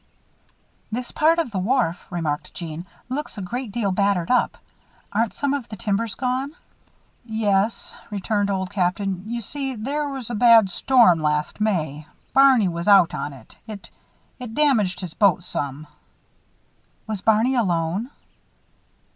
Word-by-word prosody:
"This 240 +2 -3
part 320 +2 +3
of 330 -8 -1
the 195 - -2
wharf," 210 -4 0
remarked 160 -4 -3
Jeanne, 170 +1 -6 0.2
"looks 270 0 -4
a - - -4
great 240 +4 -4
deal 210 -3 -1
battered 195 -2 +1
up. 250 - +2 0.6
Aren't 225 +1 0
some 285 -1 0
of 275 -5 -4
the 215 - -6
timbers 210 +2 -1
gone?" 260 +3 -2 0.7
"Yes," 220 -2 0 0.2
returned 205 0 -1
Old 190 -2 -2
Captain. 190 0 -1
"You 235 +1 -3
see 270 +3 -3
there 285 +6 -2
was 265 -4 -5
a - - -3
bad 225 -3 +6
storm 230 -5 +4
last 150 +5 -1
May 155 -8 -1 0.3
Barney 265 -6 +6
was 170 +1 -4
out 195 -4 +6
in 145 - -3
it. 130 -5 -14
It 200 -4 -8 0.5
it 240 -3 -7
damaged 235 -12 +2
his 180 -4 -6
boat 180 -2 +3
some." 145 -3 -4 1.2
"Was 215 -3 -4
Barney 220 +5 +3
alone?" 185 -1 0
210 Hz, 145 wpm, -23 LUFS, 180-245 Hz, 1.2 s, bad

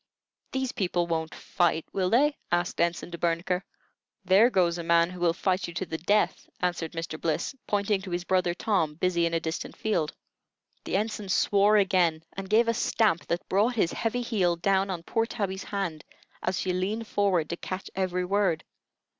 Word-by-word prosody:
"These 265 -1 -1
people 175 -2 0
won't 160 -1 -2
fight, 165 -2 0
will 185 -2 +1
they?" 285 +7 +3 0.2
asked 175 0 0
Ensign 170 0 0
De 170 - -6
Bernicre. 170 +2 0 0.6
"There 195 +6 +6
goes 175 -5 +2
a - - -4
man 170 +1 +3
who 180 - -9
will 175 -1 +3
fight 185 0 0
you 170 - -9
to 190 - -2
the 160 -1 -5
death," 205 +5 +1
answered 175 -2 -2
Mr. 165 -1 -5
Bliss, 160 - -1
pointing 205 -1 +1
to 190 - -8
his 175 0 -2
brother 180 -1 +1
Tom, 180 -8 0
busy 170 0 +1
in 165 - -2
a - - +2
distant 160 0 -4
field. 175 -8 0 0.7
The - - 0
Ensign 210 -1 -3
swore 205 +2 +4
again, 180 -5 +2
and 195 0 -6
gave 225 +3 +4
a 230 - +3
stamp 220 -6 +1
that 170 +1 -2
brought 215 +6 +2
his 190 -7 +1
heavy 245 +2 -1
heel 190 -7 +1
down 195 +3 +1
on 175 -3 -4
poor 225 +5 0
Tabby's 200 -5 -3
hand, 185 -6 -3 0.4
as 185 0 -1
she 185 - -1
leaned 205 +5 -1
forward 195 -7 +1
to 170 - -3
catch 185 +2 -5
every 180 -1 -1
word. 195 -4 +1
185 Hz, 190 wpm, -27 LUFS, 170-205 Hz, 0.7 s, There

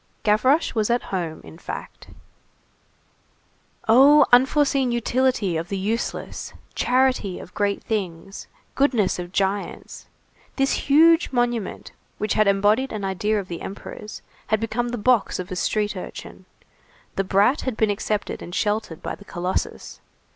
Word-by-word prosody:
Gavroche 255 +9 +3
was 215 -1 0
at 240 +1 +1
home, 170 -4 -3
in 160 - -13
fact. - - -8 1.8
Oh, 275 +5 +7
unforeseen 265 0 +4
utility 240 -6 +1
of 165 +2 -4
the 195 - -2
useless! 215 +5 -3 0.2
Charity 255 -7 +1
of - - -11
great 200 -1 -1
things! 195 -3 -4 0.3
Goodness 240 -10 +1
of 175 0 -6
giants! 195 +1 -3 0.5
This 270 +1 0
huge 325 +3 +5
monument, 240 -4 -2 0.3
which 215 0 -1
had 215 -1 +3
embodied 205 +6 +2
an 210 -3 -4
idea 205 +3 0
of 195 - -6
the 170 -2 -6
Emperor's, 210 +2 -8 0.2
had 215 - +1
become 225 +2 -2
the 245 - -3
box 240 0 +2
of 185 0 -6
a - - -3
street 210 +3 -1
urchin. 185 - -9 0.7
The 195 - 0
brat 200 +9 +3
had 255 -4 -3
been 220 -2 +2
accepted 205 +1 -3
and 175 - -7
sheltered 210 -6 -1
by - - -3
the 200 - -12
colossus. 180 0 -4
215 Hz, 140 wpm, -23 LUFS, 195-250 Hz, 1.8 s, Oh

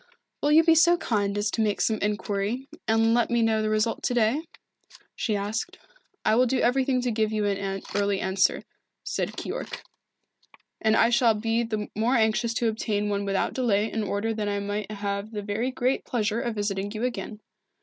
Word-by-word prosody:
"Will 290 - +2
you 320 +2 +7
be 330 0 +5
so 340 +2 +5
kind 205 -8 -1
as 205 0 0
to 225 - -1
make 210 -2 0
some 220 -1 +1
inquiry, 210 +4 -2 0.2
and 225 0 +3
let 240 -1 +2
me 235 -1 +2
know 220 -1 +2
the 215 - 0
result 215 +1 0
to 245 - -1
day?" 245 +8 +1 0.7
she 215 - -1
asked. 205 +2 -3 0.5
"I - - +4
will 250 +3 +4
do 260 +1 +1
everything 255 +1 +2
to 245 -1 -1
give 220 -1 0
you 215 -1 0
an 195 -1 -2
early 200 -1 +1
answer," 190 0 +1 0.4
said - - -3
Keyork. - - -5 1.0
"And 220 0 +3
I 230 +1 +4
shall 235 -2 +4
be 225 +2 0
the 215 -3 -3
more 230 +5 +1
anxious 225 0 +1
to 235 - +1
obtain 210 -2 -1
one 200 0 -1
without 195 -1 0
delay 220 -4 +1
in 225 - -2
order 210 +2 -1
that 210 -1 -2
I 205 0 -1
may 205 +1 -3
have 200 0 -3
the 210 -1 -4
very 215 +5 -1
great 260 +1 0
pleasure 225 -1 -1
of 240 -3 -3
visiting 205 -1 -2
you 220 +2 -4
again. 235 -3 -3
220 Hz, 195 wpm, -26 LUFS, 205-235 Hz, 1.0 s, you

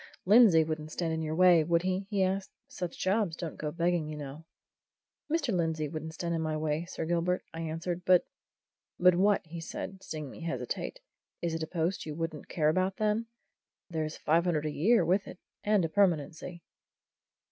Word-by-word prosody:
"Lindsey 200 -5 +7
wouldn't 155 -1 -4
stand 165 -1 -2
in 160 - -2
your 155 0 -2
way, 175 -2 +6
would 170 +2 +2
he?" 185 +1 -1
he 200 -3 +1
asked. 190 +1 -1 0.2
"Such 180 -2 -5
jobs 190 -3 +1
don't 165 -2 -5
go 150 - -3
begging, 170 -1 0
you 155 0 -6
know." 145 +2 -8 0.9
"Mr. 295 -8 +1
Lindsey 160 -3 0
wouldn't 160 +1 -6
stand 170 0 -2
in 165 - -1
my 155 -1 -1
way, 155 +1 -1
Sir 165 -2 -5
Gilbert," 175 +2 0
I 165 - -5
answered. 165 +2 -3
"But 180 -1 +5 0.4
" - - -62 0.3
"But 180 0 +6
what?" 195 +2 +3
said 165 - -5
he, 195 - -14
seeing 155 -6 -6
me - - -11
hesitate. 170 - -4 0.4
"Is 170 -1 0
it 165 - -3
a 160 - -2
post 170 +1 -2
you 150 - -4
wouldn't 165 -2 -5
care 155 -2 +2
about, 185 +4 +1
then? 215 +2 0 0.6
There's 155 -2 -2
five 165 +3 +2
hundred 155 -4 0
a 155 - -1
year 215 +11 +3
with 190 +3 +1
it - - -9 0.3
and 205 -4 +3
a - - -2
permanency." 170 -2 0
170 Hz, 190 wpm, -30 LUFS, 160-185 Hz, 0.9 s, Lindsey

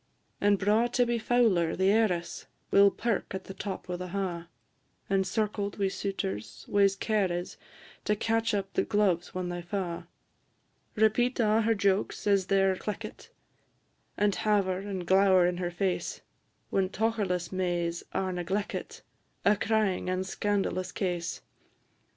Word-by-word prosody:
And 205 0 +4
braw 210 +5 +3
Tibby 240 -1 +1
Fowler, 220 -9 +2
the 190 +1 +3
heiress, 200 -6 0 0.2
Will 200 0 +7
perk 220 -2 -2
at 190 - -5
the 195 - -9
top 195 0 -6
o' 180 - -3
the 180 +1 -5
ha', 180 -3 -3 0.6
Encircled 200 +1 0
wi' 195 -2 +1
suitors, 110 - -4
whase 200 -1 +3
care 205 -3 0
is 175 +1 -4 0.5
To 210 - +2
catch 225 +1 0
up 195 -1 -3
the - - +2
gloves 190 -5 0
when 180 -1 -2
they 175 0 -4
fa'. 175 -1 -4 0.9
Repeat 240 +4 +2
a' 220 -1 +3
her 225 +1 +2
jokes 200 -1 0
as 200 -2 +3
they 195 0 +3
're 190 -1 +3
cleckit, 210 - -6 0.9
And 205 -1 +2
haver 195 -4 +1
and 195 -2 -5
glower 190 0 +5
in 175 0 0
her 175 -1 -2
face, 180 +1 -2 0.5
When 190 -1 +1
tocherless 205 -5 -1
Mays 175 -2 -1
are 185 -1 -1
negleckit 185 +4 -3 0.4
A 205 +1 +5
crying 210 -3 0
and 185 +1 -1
scandalous 190 -2 -1
case. 175 -3 -3
195 Hz, 145 wpm, -29 LUFS, 180-210 Hz, 0.9 s, Will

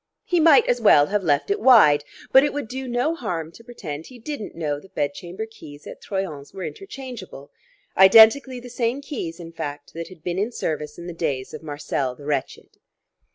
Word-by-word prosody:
He 355 - +1
might 315 -3 +6
as 245 -1 0
well 145 -9 +6
have 205 +5 -1
left 150 - +1
it 410 - 0
wide, 155 - +6 0.3
but 265 - +7
it 290 - 0
would 285 -5 -4
do 260 +3 -6
no 245 +6 0
harm 170 - -4
to 230 - -16
pretend 165 -11 -8
he 255 - -13
didn't 240 -2 -7
know 150 -3 -2
the 190 - -17
bed 145 -4 -2
chamber 180 +8 -7
keys 150 -10 -13
at - - -10
Troyon's 190 -7 -5
were 190 - -6
interchangeable 250 - -9 0.4
identically 225 +7 +7
the 245 - -11
same 245 +2 -2
keys, 180 - -6
in 165 -1 -9
fact, 145 -3 -7
that 165 0 -6
had 180 -4 -15
been 175 +1 -2
in 215 +4 -1
service 150 -8 -4
in 170 - -9
the 175 - -6
days 140 -6 -3
of - - -7
Marcel 145 -4 -3
the 145 - -13
wretched. 145 -3 -4
190 Hz, 200 wpm, -23 LUFS, 150-245 Hz, 0.4 s, but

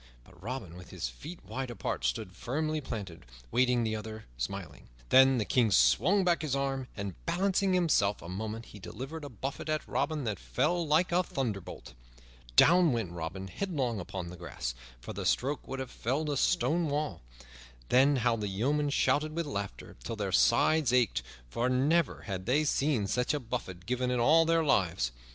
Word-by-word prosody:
But - - -19
Robin, 110 -6 -5
with 90 - -12
his - - -4
feet 155 - -10
wide 130 -1 -4
apart, 115 - -3
stood 75 - -1
firmly 155 - -2
planted, 100 - -6 0.3
waiting 125 -1 +3
the 110 -1 -1
other, 110 0 -7
smiling. 85 +4 -6 0.2
Then 130 0 +7
the 110 - 0
King 120 -1 +3
swung 100 - +4
back 175 -2 +2
his 150 -4 -1
arm, 135 -1 -2
and, 100 -3 -6
balancing 190 +2 +1
himself 150 - +2
a - - -10
moment, 110 +5 -5
he 105 - -12
delivered 135 +11 -7
a 145 - -6
buffet 135 +3 -5
at 155 0 -1
Robin 155 -3 -1
that 105 -5 -2
fell 160 - 0
like 160 +5 +3
a 175 +1 +4
thunderbolt. 110 - -4 0.6
Down 175 - +6
went 110 -7 -2
Robin 90 +3 -5
headlong 130 - -2
upon 90 -1 -5
the 90 - -10
grass, 70 -8 -5 0.3
for - - -8
the - - -5
stroke 140 +2 0
would 135 - -4
have 130 -2 -5
felled 145 +6 -1
a - - 0
stone 155 +7 +2
wall. 150 +1 -2 0.7
Then 135 +3 +5
how 120 -2 +2
the 105 -2 -3
yeomen 140 +10 0
shouted 155 +2 +1
with 170 0 -1
laughter 100 -9 -6
till 115 - -4
their 100 -3 -3
sides 135 - +4
ached, 125 -4 +2 0.3
for 120 - -1
never 145 +5 +2
had 95 -2 -5
they 140 +5 +3
seen 140 -6 +1
such 125 +7 0
a - - -1
buffet 115 -8 -5
given 125 +2 -1
in 125 -1 0
all 160 +7 +5
their 165 0 +3
lives. 85 - +1
125 Hz, 180 wpm, -30 LUFS, 100-150 Hz, 0.7 s, Then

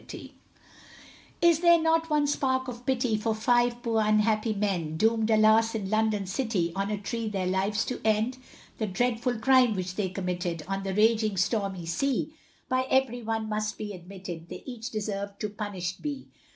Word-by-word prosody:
COPY - - -22
OF - - -28
VERSES. - - -12 1.1
Is 340 -2 +5
there 340 -1 +6
not 325 0 +2
one 300 -1 +2
spark 260 -2 0
of 245 0 -8
pity, 250 -4 +1
For 220 +1 -1
five 240 +2 +2
poor 225 -2 +1
unhappy 215 +1 +2
men, 190 -7 -1
Doomed, 225 +2 +2
alas! 220 +1 +4
in 200 -2 -3
London 215 -2 +1
city, 190 -4 -1
On 195 +1 -1
a 210 - -1
tree 225 +2 -3
their 195 -3 -2
lives 195 +4 0
to 250 - -4
end? 220 +4 +1 0.4
The 215 - 0
dreadful 240 +4 0
crime 255 -1 +4
which 185 -1 -3
they 190 -1 -1
committed, 180 -3 -3
On 195 0 -2
the 195 -1 -3
raging, 215 -1 +3
stormy 195 -2 -1
sea, 275 - -1 0.3
By 255 0 0
every 260 -2 +2
one 225 -1 -2
must 215 0 -2
be 210 -1 -5
admitted, 175 -2 -9
They - - -8
each 245 -3 -6
deserved 200 -3 -4
to 210 - -1
punished 195 -4 -5
be. 290 -3 -5
215 Hz, 180 wpm, -28 LUFS, 195-245 Hz, 1.1 s, there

